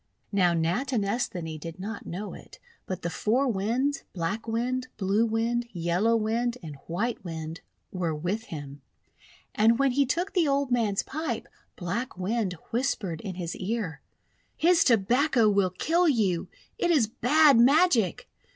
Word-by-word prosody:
Now 180 -4 +3
Natinesthani 195 - -1
did 165 +2 -8
not 205 +3 -6
know 200 +4 -5
it, - - -13 0.3
but 185 -1 -5
the 170 - -1
Four 245 +10 +1
Winds 245 +7 0
— - - -47
Black 195 +6 -3
Wind, 250 +3 -1
Blue 205 +3 +2
Wind, 230 +2 0
Yellow 180 +6 +1
Wind, 230 +2 0
and 155 -3 -7
White 210 +8 -2
Wind 160 -2 -6 0.2
— - - -47
were 175 -4 -2
with 185 +9 -3
him. 145 -5 -8 0.7
And 225 +2 +4
when 275 0 +3
he 275 +1 +2
took 350 +9 -1
the 350 -5 +3
old 280 -1 +1
man's 220 -5 +1
pipe, 290 -5 -4 0.3
Black 205 +6 -4
Wind 195 +1 -1 0.2
whispered 225 - -1
in 190 -3 -6
his 175 -2 -4
ear: 190 -7 -3 0.3
— - - -42
'His 345 +1 +4
Tobacco 240 +2 +3
will 200 -2 +3
kill 330 - +2
you! 200 - +1 0.3
It 350 - +1
is 300 -9 +4
bad 275 +4 +4
magic! 260 - +4
220 Hz, 155 wpm, -27 LUFS, 180-255 Hz, 0.7 s, And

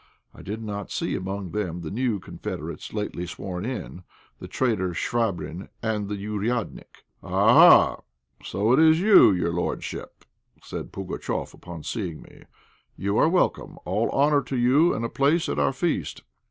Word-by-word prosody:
I - - -13
did 110 +3 -6
not 100 -2 -5
see - - -2
among 95 -1 -4
them 90 -4 -3
the 80 - -6
new 115 -1 -1
confederates 95 - -7
lately 105 -4 -4
sworn 90 +2 -6
in, 125 -7 -5 0.4
the - - -8
traitor 105 -8 0
Chvabrine 100 -6 -2
and 105 -3 -1
the 105 - -2
"ouriadnik." 105 +2 -4 0.2
"Ah, - - +6
ah! - - -22 0.4
so 105 +5 +1
it 130 - +4
is 160 0 +6
you, 195 - +7
your 85 -2 0
lordship," 85 - -5 0.4
said - - -7
Pugatchéf, 95 -1 -4
upon 85 -3 -10
seeing 90 -9 -4
me. - - -17 0.5
"You 100 +2 0
are 155 - +4
welcome. 180 +1 0
All 105 +6 0
honour 145 +1 +3
to 135 - -4
you, 135 +8 +4
and 115 - -2
a - - 0
place 145 +7 +1
at 70 - -2
our 70 -1 +2
feast." - - -2
105 Hz, 160 wpm, -25 LUFS, 95-125 Hz, 0.5 s, you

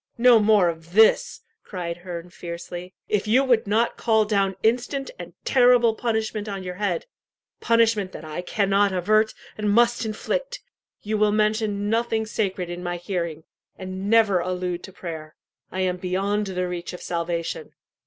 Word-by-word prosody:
"No 240 -1 +6
more 210 -3 +4
of 165 0 -5
this!" 220 - +4 0.2
cried 170 -3 -5
Herne 175 -1 -8
fiercely. 175 +1 -8
"If 210 0 0
you 250 +5 +4
would 240 -5 +2
not 225 +3 +1
call 220 -2 +3
down 200 -2 +1
instant 245 +4 0
and - - -8
terrible 245 -3 +5
punishment 220 -2 -2
on 195 -2 -5
your 180 -1 -5
head 180 -3 -2 0.5
punishment 225 -4 +2
that 160 - -9
I 155 +3 -5
cannot 200 +2 +2
avert, 215 +4 +2 0.2
and 210 -1 0
must 235 +3 +3
inflict - - -3 0.4
you 215 0 -1
will 210 0 +4
mention 210 -1 0
nothing 225 0 0
sacred 195 -4 -2
in 175 +1 -6
my 175 0 -3
hearing, 170 -3 -4 0.3
and 190 +1 -5
never 220 -5 +4
allude 180 0 -3
to - - -12
prayer, 160 -4 -8 0.4
I 190 - -2
am 180 -1 0
beyond 195 +3 -1
the 180 -1 -2
reach 175 0 -5
of 180 - -8
salvation." 170 -1 -3
200 Hz, 160 wpm, -24 LUFS, 180-220 Hz, 0.5 s, No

